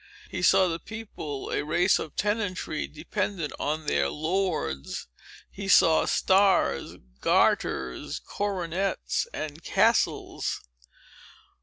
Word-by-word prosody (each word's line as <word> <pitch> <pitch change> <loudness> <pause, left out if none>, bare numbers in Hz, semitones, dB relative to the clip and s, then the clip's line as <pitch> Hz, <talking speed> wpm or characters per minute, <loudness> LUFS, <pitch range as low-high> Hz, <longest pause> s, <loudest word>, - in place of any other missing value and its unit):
He - - -3
saw 190 - +5
the 165 -1 -2
people 200 -11 -7
a - - 0
race 175 +5 +3
of 155 - -6
tenantry, 205 -6 -1
dependent 170 +1 -3
on 155 +2 -2
their 70 - +1
lords. 160 - -2 0.4
He 195 0 -6
saw 165 -4 +6
stars, 190 - +2 0.2
garters, 65 -1 +1
coronets, 195 - -2
and 155 +1 -6
castles. - - +1
170 Hz, 100 wpm, -27 LUFS, 150-195 Hz, 0.4 s, saw